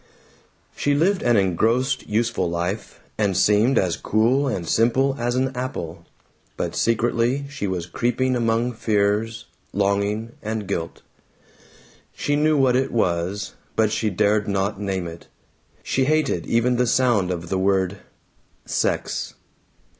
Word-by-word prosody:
She 145 Hz, 0 st, +1 dB
lived 180 Hz, +6 st, +2 dB
an 120 Hz, -2 st, +3 dB
engrossed 110 Hz, +8 st, +1 dB
useful 110 Hz, -4 st, 0 dB
life, 90 Hz, +5 st, -4 dB, 0.2 s
and 100 Hz, -4 st, +1 dB
seemed 105 Hz, +7 st, +4 dB
as 90 Hz, -3 st, +2 dB
cool 125 Hz, +6 st, +1 dB
and 95 Hz, -10 st, -2 dB
simple 130 Hz, +7 st, +2 dB
as 120 Hz, +1 st, 0 dB
an 130 Hz, 0 st, 0 dB
apple. 125 Hz, -10 st, -5 dB, 0.5 s
But -, -, -3 dB
secretly 120 Hz, +4 st, +1 dB
she 140 Hz, -8 st, -4 dB
was 90 Hz, -3 st, -2 dB
creeping 125 Hz, +7 st, 0 dB
among 115 Hz, +1 st, +1 dB
fears, 110 Hz, +1 st, 0 dB, 0.3 s
longing, 100 Hz, +3 st, 0 dB
and 110 Hz, -1 st, -3 dB
guilt. 85 Hz, -4 st, -4 dB, 1.1 s
She 145 Hz, -, 0 dB
knew 155 Hz, +1 st, +3 dB
what 130 Hz, -2 st, +3 dB
it 130 Hz, +1 st, +1 dB
was, 95 Hz, -1 st, -1 dB, 0.2 s
but 110 Hz, -1 st, +2 dB
she 110 Hz, 0 st, 0 dB
dared 105 Hz, +2 st, +1 dB
not 100 Hz, 0 st, -1 dB
name 95 Hz, -3 st, -2 dB
it. 85 Hz, 0 st, -9 dB, 0.6 s
She 130 Hz, -, +1 dB
hated 150 Hz, -, +1 dB
even 120 Hz, +2 st, +2 dB
the 125 Hz, 0 st, +2 dB
sound 115 Hz, -7 st, +2 dB
of 85 Hz, -2 st, -4 dB
the 95 Hz, -, 0 dB
word 95 Hz, 0 st, +1 dB, 0.7 s
"sex." -, -, -1 dB
110 Hz, 135 wpm, -23 LUFS, 95-125 Hz, 1.1 s, seemed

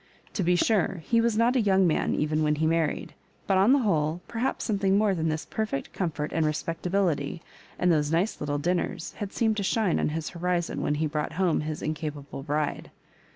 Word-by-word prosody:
To 205 Hz, -, -1 dB
be 180 Hz, 0 st, +3 dB
sure, 190 Hz, -2 st, +1 dB
he 230 Hz, -1 st, +3 dB
was 230 Hz, -2 st, +1 dB
not 235 Hz, +3 st, +3 dB
a 250 Hz, -, +4 dB
young 195 Hz, -2 st, +4 dB
man 160 Hz, -, +1 dB
even 155 Hz, +1 st, 0 dB
when 150 Hz, 0 st, +2 dB
he 155 Hz, +1 st, 0 dB
married; 165 Hz, 0 st, 0 dB, 0.3 s
but, 190 Hz, -1 st, +3 dB
on 200 Hz, +6 st, +5 dB
the 280 Hz, -, +6 dB
whole, 155 Hz, -3 st, +1 dB
perhaps 235 Hz, +3 st, -2 dB
some 210 Hz, -4 st, 0 dB
thing 195 Hz, 0 st, +3 dB
more 210 Hz, -1 st, +3 dB
than 165 Hz, -3 st, 0 dB
this 155 Hz, 0 st, -2 dB
perfect 215 Hz, -11 st, -3 dB
comfort 155 Hz, -5 st, -2 dB
and 160 Hz, -, +1 dB
respec 155 Hz, +2 st, -2 dB
tability, 175 Hz, -5 st, 0 dB, 0.4 s
and 180 Hz, -, +3 dB
those 150 Hz, -2 st, +1 dB
nice 175 Hz, +7 st, +1 dB
little 145 Hz, 0 st, -1 dB
dinners, 175 Hz, +1 st, -2 dB
had 205 Hz, -1 st, -4 dB
seemed 220 Hz, -2 st, +1 dB
to -, -, 0 dB
shine 200 Hz, -2 st, +1 dB
on -, -, +1 dB
his 155 Hz, +1 st, -3 dB
horizon 175 Hz, -1 st, -1 dB
when 150 Hz, -, 0 dB
lie 155 Hz, +2 st, 0 dB
brought 150 Hz, 0 st, -2 dB
homo 175 Hz, -1 st, +1 dB
his 155 Hz, 0 st, -4 dB
incapable 150 Hz, -3 st, -4 dB
bride. 150 Hz, +1 st, -2 dB
170 Hz, 210 wpm, -27 LUFS, 155-195 Hz, 0.4 s, the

